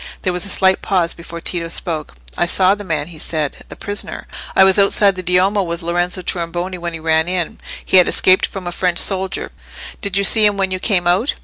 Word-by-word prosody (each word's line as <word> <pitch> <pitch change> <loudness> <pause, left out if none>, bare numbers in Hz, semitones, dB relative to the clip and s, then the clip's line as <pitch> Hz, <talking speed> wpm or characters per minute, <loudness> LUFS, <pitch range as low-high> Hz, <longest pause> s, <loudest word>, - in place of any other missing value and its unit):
There 185 - 0
was 180 +3 0
a - - -2
slight 190 0 +2
pause 180 -4 0
before 170 0 -10
Tito 170 -1 -3
spoke. 160 -2 -4 0.2
"I 175 - 0
saw 185 +2 +3
the 205 0 -6
man," 160 -4 -3
he 160 -3 -10
said,—"the 155 -2 -4
prisoner. 205 -1 -5 0.3
I - - +7
was 190 +1 +4
outside 200 0 +4
the 185 - -5
Duomo 185 +3 +2
with 170 -1 -4
Lorenzo 175 +2 -1
Tornabuoni 175 +2 -4
when 170 0 -5
he 165 - -4
ran 160 0 +1
in. 180 -2 -2 0.3
He - - +4
had 180 - +6
escaped 185 0 +3
from 195 -2 -8
a 175 - -3
French 180 0 -1
soldier. 190 -1 -1 0.5
Did 200 -2 -1
you 200 - +1
see 215 +2 +5
him 205 -1 +3
when 190 -1 -1
you 185 - -2
came 185 -3 0
out?" 185 +10 +1
180 Hz, 220 wpm, -17 LUFS, 170-195 Hz, 0.5 s, I